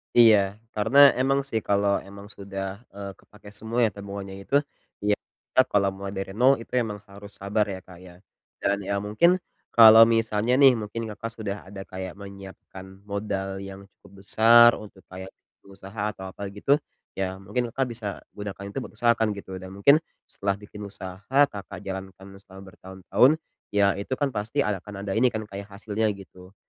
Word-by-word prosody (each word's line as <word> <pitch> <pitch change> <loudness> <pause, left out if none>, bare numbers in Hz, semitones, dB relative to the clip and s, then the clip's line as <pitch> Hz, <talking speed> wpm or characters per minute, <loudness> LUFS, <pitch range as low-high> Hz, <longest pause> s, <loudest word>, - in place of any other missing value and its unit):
Iya. 115 -3 +8 0.4
Karena 115 +7 +3 0.2
emang 135 +2 +2
sih 110 - 0
kalau 100 -1 +1
emang 100 +1 -11
sudah, 95 0 -6 0.2
eee, 100 -1 -6
kepake 105 -1 -16
semua 110 +3 -3
ya 105 - 0
tabungannya 100 -1 -7
itu, 140 - 0 0.5
yap 105 - +2 0.4
Kak 130 - +5
kalau 100 -1 +3
mulai 100 0 -6
dari 95 0 -4
nol 130 +4 +5
itu 115 - -12
emang 105 -2 -5
harus 100 0 -12
sabar 105 +2 +1
ya 95 -2 -5
Kak 90 -1 -15
ya. 90 -1 -14 0.5
Dan 100 0 +2
ya 100 +1 -2
mungkin 110 - +3 0.4
kalau 115 -1 +10
misalnya 115 +1 +1
nih, 135 -1 +7
mungkin 105 +2 -5
Kakak 115 +2 -6
sudah 105 -2 -4
ada 95 0 -8
kayak 95 0 -7
menyiapkan 95 -1 -12
modal 100 -1 -4
yang 95 0 -9
cukup 100 0 -18
besar 120 +3 +8
untuk 100 -3 -13
kayak 95 +1 -8 0.3
pengusaha 100 +1 -9
atau 95 - -10
apa 100 - -7
gitu, 105 +9 +1 0.4
ya 95 -1 -2
mungkin 120 +5 -2
Kakak 135 - +1
bisa 115 -2 -2 0.2
gunakan 100 -1 -7
itu - - -9
buat - - -11
usaha 120 +2 +4
kan 110 -2 +1
gitu. 95 -2 -8
Dan 95 +1 -10
mungkin 140 +10 +5 0.3
setelah 100 0 -1
bikin 105 +1 -13
usaha, 95 0 -7 0.2
Kakak 100 -2 -8
jalankan 95 0 -7
setelah 95 0 -13
bertahun-tahun 95 +7 +1 0.4
ya 100 -1 +4
itu 100 - -8
kan 145 -1 -1
pasti 115 +6 -1
ada 100 -3 -1
akan 100 0 -9
ada 100 - -4
ini 115 +5 +3
kan 110 -2 -3
kayak 100 -1 -8
hasilnya 105 +2 -2
gitu. 95 0 -15
100 Hz, 180 wpm, -25 LUFS, 95-110 Hz, 0.5 s, kalau